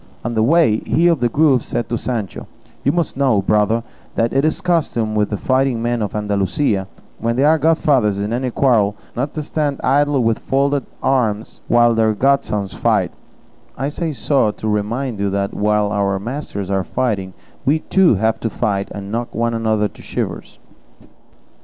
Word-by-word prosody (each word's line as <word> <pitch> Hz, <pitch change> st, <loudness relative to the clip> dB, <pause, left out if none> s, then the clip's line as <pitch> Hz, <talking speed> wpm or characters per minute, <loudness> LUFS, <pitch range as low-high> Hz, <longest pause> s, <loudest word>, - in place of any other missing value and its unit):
On 120 Hz, -, -1 dB
the 110 Hz, -, +1 dB
way, 140 Hz, -3 st, +4 dB
he 165 Hz, +8 st, 0 dB
of 170 Hz, -4 st, +4 dB
the 120 Hz, 0 st, +1 dB
Grove 140 Hz, -1 st, +3 dB
said 120 Hz, -, -3 dB
to 120 Hz, -, 0 dB
Sancho, 115 Hz, -5 st, -4 dB, 0.4 s
"You 140 Hz, -, +3 dB
must 170 Hz, -1 st, -1 dB
know, 130 Hz, -8 st, +2 dB
brother, 105 Hz, +3 st, +2 dB, 0.3 s
that 115 Hz, 0 st, +1 dB
it 135 Hz, +1 st, +2 dB
is 155 Hz, -, +1 dB
the 195 Hz, -, -15 dB
custom 150 Hz, -11 st, 0 dB
with 105 Hz, -1 st, +1 dB
the 105 Hz, -, -2 dB
fighting 130 Hz, -1 st, +1 dB
men 120 Hz, 0 st, -1 dB
of 105 Hz, -1 st, -3 dB
Andalusia, 100 Hz, 0 st, 0 dB, 0.3 s
when 115 Hz, +1 st, -1 dB
they 130 Hz, -, +2 dB
are 155 Hz, +2 st, +4 dB
godfathers 140 Hz, -9 st, +2 dB
in 105 Hz, +3 st, -2 dB
any 125 Hz, +1 st, -1 dB
quarrel, 115 Hz, -6 st, +2 dB, 0.2 s
not 140 Hz, +4 st, -3 dB
to 155 Hz, -, -3 dB
stand 145 Hz, -1 st, -2 dB
idle 140 Hz, 0 st, +2 dB
with 115 Hz, -1 st, +1 dB
folded 140 Hz, 0 st, 0 dB, 0.2 s
arms 115 Hz, -5 st, 0 dB
while 120 Hz, 0 st, +4 dB
their 110 Hz, -1 st, +2 dB
godsons 105 Hz, -6 st, +1 dB
fight; -, -, +1 dB, 0.7 s
I 135 Hz, +3 st, -1 dB
say 160 Hz, +2 st, -3 dB
so 135 Hz, -4 st, +1 dB
to 110 Hz, -, -5 dB
remind 110 Hz, +3 st, -2 dB
you 100 Hz, 0 st, 0 dB
that 100 Hz, 0 st, -2 dB
while 105 Hz, 0 st, +1 dB
our 100 Hz, -1 st, 0 dB
masters 100 Hz, -3 st, -5 dB
are 95 Hz, -1 st, +1 dB
fighting, 100 Hz, -6 st, -2 dB, 0.3 s
we, 145 Hz, +4 st, +3 dB
too, 190 Hz, -, +3 dB
have 110 Hz, +3 st, 0 dB
to 115 Hz, -, -2 dB
fight, 100 Hz, -2 st, -1 dB
and 100 Hz, 0 st, -7 dB
knock 120 Hz, +2 st, -3 dB
one 115 Hz, +1 st, 0 dB
another 110 Hz, -2 st, +1 dB
to -, -, -16 dB
shivers." -, -, -5 dB
115 Hz, 185 wpm, -19 LUFS, 105-140 Hz, 0.7 s, way